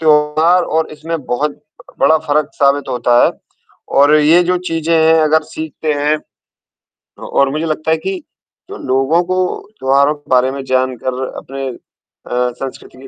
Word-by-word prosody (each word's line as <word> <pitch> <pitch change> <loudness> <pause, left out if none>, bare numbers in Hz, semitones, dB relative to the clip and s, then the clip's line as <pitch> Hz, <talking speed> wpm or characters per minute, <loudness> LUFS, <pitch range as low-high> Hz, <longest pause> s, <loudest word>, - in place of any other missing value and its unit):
त्योहार 155 +3 +3
और 160 0 -1
इसमें 160 +2 -4
बहुत 145 +4 -2 0.4
बड़ा 160 0 +5
फ़र्क 150 0 +1
साबित 140 -1 +1
होता 120 -1 +3
है, - - +3 0.6
और 145 +2 +4
ये 160 +4 +5
जो 180 +1 +1
चीज़ें 165 0 0
हैं 160 0 +4
अगर 155 +1 +3
सीखते 155 0 -3
हैं 150 +1 +1
अ, - - -19 0.8
और 140 -1 +1
मुझे 155 +3 -2
लगता 155 0 -2
है 160 - +3
कि 185 +2 -4 0.5
तो - - -7
लोगों 135 +6 +2
को 185 +1 -2 0.4
त्योहारों 140 +2 +3
के 145 - -23
बारे 130 +1 +4
में 135 0 -6
जानकर 130 0 -1
अपने 135 0 -6
अ, 125 0 -5
संस्कृति 135 -1 -8
के 135 - -12
150 Hz, 160 wpm, -16 LUFS, 135-160 Hz, 0.8 s, बड़ा